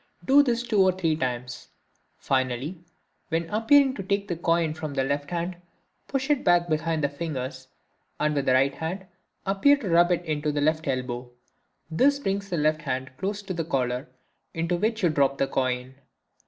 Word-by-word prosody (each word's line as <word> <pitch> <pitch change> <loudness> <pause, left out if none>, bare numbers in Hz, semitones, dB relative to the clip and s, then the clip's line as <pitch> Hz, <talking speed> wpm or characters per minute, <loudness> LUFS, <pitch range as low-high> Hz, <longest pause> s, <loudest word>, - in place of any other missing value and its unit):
Do 275 +2 +7
this 240 -4 0
two 220 -5 +2
or 190 0 +5
three 165 -4 0
times. 125 -3 -4 0.5
Finally, 130 +5 -1 0.5
when 165 0 -1
appearing 260 +6 +4
to 205 - -5
take 200 +1 -1
the 175 - -2
coin 165 -1 +1
from 155 -3 -6
the 135 - +1
left 145 +1 -2
hand, 175 +1 -3 0.5
push 270 +1 -1
it 290 - +1
back 175 0 +4
behind 155 0 0
the - - +4
fingers, 135 -3 -5 0.5
and 150 0 +1
with 140 -2 -1
the 130 - +5
right 135 +2 +3
hand 180 +6 -5 0.4
appear 200 +10 +4
to 220 -9 -5
rub 175 +1 +5
it 175 0 0
into 150 -1 -1
the 145 - -1
left 155 +1 +1
elbow; 125 -2 -3 0.6
this 275 - +3
brings 200 -6 -2
the 175 - -1
left 155 0 +1
hand 130 +1 -3
close 205 +1 -3
to 190 - -4
the 165 -2 -2
collar, 125 -5 -1 0.5
into 165 +2 0
which 220 +4 -1
you 175 - +5
drop 140 -2 +2
the 135 - +2
coin. 130 -1 -2
160 Hz, 185 wpm, -26 LUFS, 135-195 Hz, 0.6 s, Do